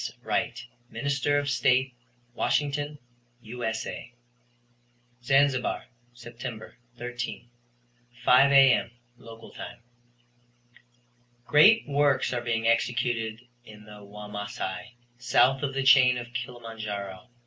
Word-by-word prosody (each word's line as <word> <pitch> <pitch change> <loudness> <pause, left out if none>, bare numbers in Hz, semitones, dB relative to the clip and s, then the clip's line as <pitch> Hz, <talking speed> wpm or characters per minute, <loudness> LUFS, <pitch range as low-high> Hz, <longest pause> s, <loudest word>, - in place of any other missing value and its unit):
Wright, - - -2 0.2
Minister 140 0 -1
of 145 0 -1
State, 130 -1 +2 0.4
Washington, 145 +3 -1 0.4
U.S.A.: 120 0 -5 1.1
Zanzibar, 135 0 +1 0.3
Sept. 120 -1 -9 0.2
13, 120 0 -6 0.8
5 135 +2 +6
A.M. 135 -4 +5 0.3
(local 115 -1 -13
time). - - -9 1.7
Great 210 +10 +5
works 140 -3 +1
are 120 - -2
being 115 -1 -1
executed 115 -1 0 0.2
in 105 -2 -14
the 105 -1 -13
Wamasai, 105 0 -7 0.2
south 125 +2 +3
of 135 -2 -3
the 135 - 0
chain 130 -2 +6
of 120 0 -8
Kilimanjaro. 115 -4 -6
120 Hz, 95 wpm, -27 LUFS, 115-135 Hz, 1.7 s, 5